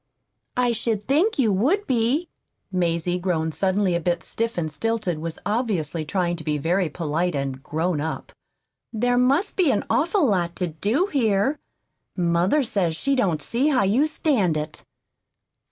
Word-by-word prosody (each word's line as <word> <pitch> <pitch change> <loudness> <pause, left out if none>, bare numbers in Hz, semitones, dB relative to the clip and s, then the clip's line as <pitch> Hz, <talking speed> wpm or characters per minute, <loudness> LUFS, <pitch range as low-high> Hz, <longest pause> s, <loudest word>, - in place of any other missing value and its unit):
"I 250 -1 +3
should 220 -2 -2
think 325 +11 +2
you 225 -7 +3
would 310 - +1
be." 255 +7 +1 0.4
Mazie, 175 -1 0
grown 165 -3 -1
suddenly 190 +2 +1
a 170 - +1
bit 170 0 -1
stiff 230 -2 -3
and 160 -3 -2
stilted, 215 -2 -2
was 165 0 -5
obviously 190 - -1
trying 175 +1 -1
to 160 - -8
be 150 -1 -1
very 175 +4 0
polite 165 +2 -1
and 135 -1 -3
"grown 160 +2 -1
up." 160 +1 -4 0.6
"There 245 +2 +1
must 275 +9 +2
be 360 -6 +3
an 215 - +1
awful 335 +2 +2
lot 175 -7 0
to 180 -3 -2
do 210 - 0
here. 260 - +1 0.6
Mother 175 - +2
says 185 -8 0
she 275 +10 0
don't 185 - 0
see 250 +5 0
how 270 -8 +3
you 235 +10 +3
stand 240 - +1
it." 150 0 -5
195 Hz, 160 wpm, -23 LUFS, 170-250 Hz, 0.6 s, I